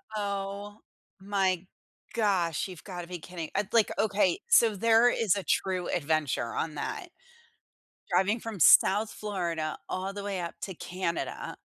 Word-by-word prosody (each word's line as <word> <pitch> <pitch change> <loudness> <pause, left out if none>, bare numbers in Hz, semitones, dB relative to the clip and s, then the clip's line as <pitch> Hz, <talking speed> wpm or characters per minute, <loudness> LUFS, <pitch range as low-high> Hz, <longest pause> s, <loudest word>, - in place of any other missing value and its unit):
Oh, 200 0 -4 0.4
my 190 -2 0 0.5
gosh, 190 -7 +1
you've 180 -3 -10
got 180 -3 -6
to 170 - -9
be 180 0 -6
kidding. 165 -1 -7
I'd 205 -1 0
be 235 - +2
like, 220 - +3
"Okay, 210 - +2
so 225 - +5
there 230 +3 +5
is 215 -6 +2
a 200 - -3
true 185 +1 0
adventure 155 -7 0
on 160 -1 -2
that. 390 - -4 1.0
Driving 205 +5 +2
from 220 -4 -6
South 205 +7 +6
Florida 170 -7 -3
all 190 +1 -3
the 200 0 -6
way 200 -2 -3
up 170 -1 -5
to 190 - -4
Canada 180 0 -4
195 Hz, 155 wpm, -29 LUFS, 175-210 Hz, 1.0 s, South